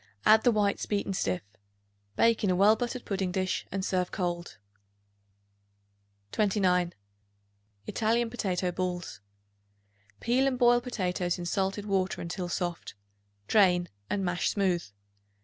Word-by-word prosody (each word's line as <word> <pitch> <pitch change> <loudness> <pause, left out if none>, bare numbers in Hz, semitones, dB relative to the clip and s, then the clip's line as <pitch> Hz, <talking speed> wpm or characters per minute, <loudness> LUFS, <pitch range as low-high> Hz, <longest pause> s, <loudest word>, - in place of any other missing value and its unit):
Add 220 +1 +7
the 245 - +5
whites 205 -2 0
beaten 200 -1 -1
stiff. 95 - -1 0.7
Bake 230 -1 +3
in 200 - +2
a 180 - +2
well 205 +4 +5
buttered 245 +2 -4
pudding 190 -2 -1
dish 185 0 -2
and 190 0 -2
serve 180 -2 0
cold. 175 -2 -3 1.7
29. 185 -4 +1 0.9
Italian 230 - 0
Potato 185 -6 -1
Balls. 180 - -4 1.0
Peel 255 +3 +2
and 260 -2 0
boil 240 -1 +5
potatoes 180 -7 -2
in 175 - -5
salted 195 +3 -1
water 190 -2 0
until 175 +1 -4
soft; 175 - -3 0.5
drain, 180 -4 +4 0.2
and 195 -2 -1
mash 180 0 0
smooth. 185 -4 +1
190 Hz, 125 wpm, -29 LUFS, 180-215 Hz, 1.7 s, Add